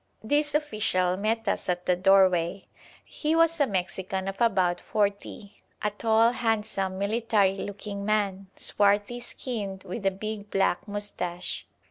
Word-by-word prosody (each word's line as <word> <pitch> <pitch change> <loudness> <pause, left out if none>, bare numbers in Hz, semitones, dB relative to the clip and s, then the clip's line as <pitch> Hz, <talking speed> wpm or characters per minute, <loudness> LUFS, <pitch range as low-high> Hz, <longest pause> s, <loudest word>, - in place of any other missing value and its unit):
This 295 +5 +1
official 210 - +1
met 220 +3 -1
us - - -1
at 180 0 -1
the 180 - +3
doorway. 185 -1 +3 0.4
He 310 +1 -1
was 330 0 +3
a 285 - +4
Mexican 190 0 -3
of 195 +2 -5
about 185 -6 +2
forty, 205 -1 -3 0.2
a 210 - +1
tall, 225 +2 +3
handsome, 215 -5 -1
military 200 -1 +1
looking 200 0 -5
man, 200 -2 0
swarthy 205 +3 +1
skinned, 205 -6 -5
with 195 +3 -6
a 195 - +4
big 210 +1 -6
black 195 -1 +1
moustache. 200 -4 -3
200 Hz, 135 wpm, -27 LUFS, 190-220 Hz, 0.4 s, a